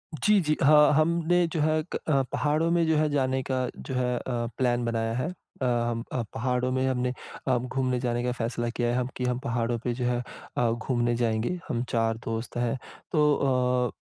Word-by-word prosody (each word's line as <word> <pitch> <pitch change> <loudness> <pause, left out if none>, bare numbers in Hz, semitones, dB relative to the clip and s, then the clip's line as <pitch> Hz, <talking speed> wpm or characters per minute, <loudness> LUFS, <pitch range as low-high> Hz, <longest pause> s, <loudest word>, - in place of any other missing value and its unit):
जी, 210 +8 +4
जी, 155 -2 +1
हाँ 150 +1 +7
हमने 170 +3 +3
जो 160 - -1
है, 155 +1 +2
क 135 -4 +1
पहाड़ों 155 +3 +1
में 170 -1 +3
जो 160 - +3
है, 150 0 +2
जाने 130 -2 +1
का 130 -1 0
जो 130 - -6
है 125 -1 +1
अ, - - -4 0.4
प्लान 120 -2 +1
बनाया 115 -1 -1
है। 130 +7 -1 0.3
अ, 130 - +1
हम 120 -1 0 0.3
पहाड़ों 125 +1 0
में 130 0 +1
हमने 125 -1 0 0.4
अ, 130 -1 +3
घूमने 125 0 -1
जाने 120 -1 -1
का 125 - 0
फैसला 120 0 -2
किया 120 0 -1
है 120 - +1
हम 125 -1 0
कि 125 - -3
हम 125 0 0
पहाड़ों 120 -1 -1
पे 120 - 0
जो 125 0 -3
है 120 0 +1 0.4
अ, 120 -1 +3
घूमने 120 0 0
जाएँगे 115 +7 0
हम 120 0 -1
4 115 -1 +1
दोस्त 115 +1 -4
हैं। 120 +1 0 0.3
तो 130 -5 +2
125 Hz, 195 wpm, -27 LUFS, 120-140 Hz, 0.4 s, हाँ